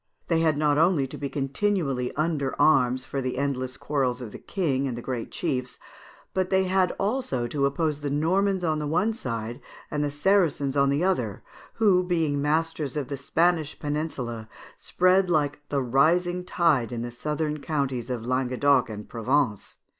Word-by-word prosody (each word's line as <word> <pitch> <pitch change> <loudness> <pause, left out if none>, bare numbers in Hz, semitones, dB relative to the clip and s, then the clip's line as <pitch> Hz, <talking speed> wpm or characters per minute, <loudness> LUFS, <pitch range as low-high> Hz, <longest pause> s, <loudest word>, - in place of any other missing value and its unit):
They 165 -1 +3
had 160 -2 +2
not 150 -1 +2
only 165 -4 +3
to 135 - -8
be 140 0 -4
continually 140 -3 -1
under 150 -3 -1
arms 130 -4 +3
for 135 - -3
the 130 -1 -3
endless 130 -2 -2
quarrels 135 -4 -1
of 120 -4 -7
the - - -9
King 140 -8 -1
and 120 -3 -4
the - - -5
great 125 -3 -4
chiefs; 130 -6 -3 0.6
but 185 -1 0
they 190 0 +3
had 185 -1 +2
also 200 - -1
to 140 +3 +1
oppose 150 +1 -1
the 145 -1 -3
Normans 185 +6 +1
on 155 -3 0
one 180 +8 +1
side, 115 - -5 0.3
and 150 0 0
the 145 - 0
Saracens 145 -3 +1
on 140 -1 +3
the 140 +4 +1
other, 125 - -1 0.3
who, 195 -5 +4
being 160 -5 0
masters 155 -1 0
of 145 -3 -3
the 140 - -2
Spanish 160 +2 +1
peninsula, 135 -7 -4 0.3
spread 185 +1 +2
like 145 -4 +1
the 140 -2 0
rising 175 +8 +2
tide 160 -10 +2
in 120 -1 -3
the 120 - -5
southern 150 +4 -2
counties 135 -5 -2
of 120 -3 -3
Languedoc 130 +1 +2
and 105 -1 -7
Provence. 120 -2 0
145 Hz, 170 wpm, -26 LUFS, 130-165 Hz, 0.6 s, who